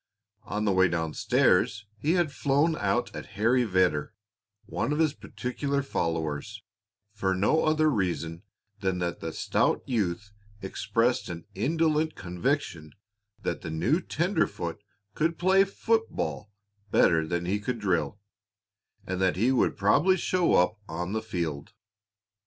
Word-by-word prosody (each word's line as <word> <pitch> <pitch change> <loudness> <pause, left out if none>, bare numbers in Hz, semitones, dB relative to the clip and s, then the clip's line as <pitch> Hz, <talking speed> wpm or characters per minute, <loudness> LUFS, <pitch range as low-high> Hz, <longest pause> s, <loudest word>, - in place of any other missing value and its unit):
On 105 +1 -2
the 100 - +3
way 95 0 +4
down 80 -2 -2
stairs 105 +1 +2
he 150 +9 +1
had 175 -5 +1
flown 145 +4 +2
out 115 +1 -1
at - - -7
Harry 120 +4 +3
Vedder, 90 -3 +1 0.5
one 115 +7 -2
of 150 - 0
his 155 -2 +2
particular 140 +1 -3
followers, 80 - -3 0.5
for 95 -2 0
no 105 +12 +2
other 155 0 +3
reason 85 - -1 0.4
than 95 -2 -1
that 85 -1 -2
the 80 - -4
stout - - +1
youth 105 -4 -2 0.3
expressed 110 +5 0
an 85 -1 -7
indolent 155 +3 +1
conviction 90 - -2 0.5
that - - -2
the - - -6
new 100 - +1
tenderfoot 160 - -1 0.3
could 165 +5 0
play 190 +2 +5
football 220 - -1 0.4
better 80 -4 +3
than 85 +1 -2
he 100 +4 0
could 120 +4 -3
drill, 100 -1 0 0.9
and 95 -1 -3
that 95 -1 +2
he 115 +8 +2
would 130 - +2
probably 140 - +4
show 180 -1 +2
up 90 +4 +3
on 90 +3 -3
the 110 - -1
field. 85 -8 -4
105 Hz, 140 wpm, -27 LUFS, 90-145 Hz, 0.9 s, play